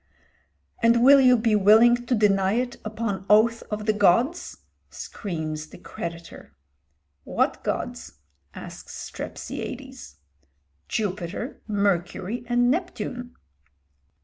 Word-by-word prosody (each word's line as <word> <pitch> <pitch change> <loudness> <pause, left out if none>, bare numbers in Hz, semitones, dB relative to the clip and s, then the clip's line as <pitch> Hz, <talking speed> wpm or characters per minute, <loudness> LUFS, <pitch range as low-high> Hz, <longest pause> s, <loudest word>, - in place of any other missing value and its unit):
"And 235 +1 +4
will 275 +1 +8
you 250 -1 +6
be 225 -1 +2
willing 230 +4 +5
to 250 - +2
deny 195 -2 +2
it 245 +1 -2
upon 215 -3 -3
oath 225 +2 +4
of 210 0 -4
the 215 - +2
gods?" 230 - +2 0.3
screams 155 -6 -5
the - - -13
creditor. 170 - -8 0.7
"What - - -1
gods?" - - -4 0.4
asks - - -10
Strepsiades. 70 +1 -7 0.7
"Jupiter, 205 - -4
Mercury, 200 +2 -1
and 245 +1 +3
Neptune." 250 - -4
215 Hz, 100 wpm, -24 LUFS, 190-240 Hz, 0.7 s, will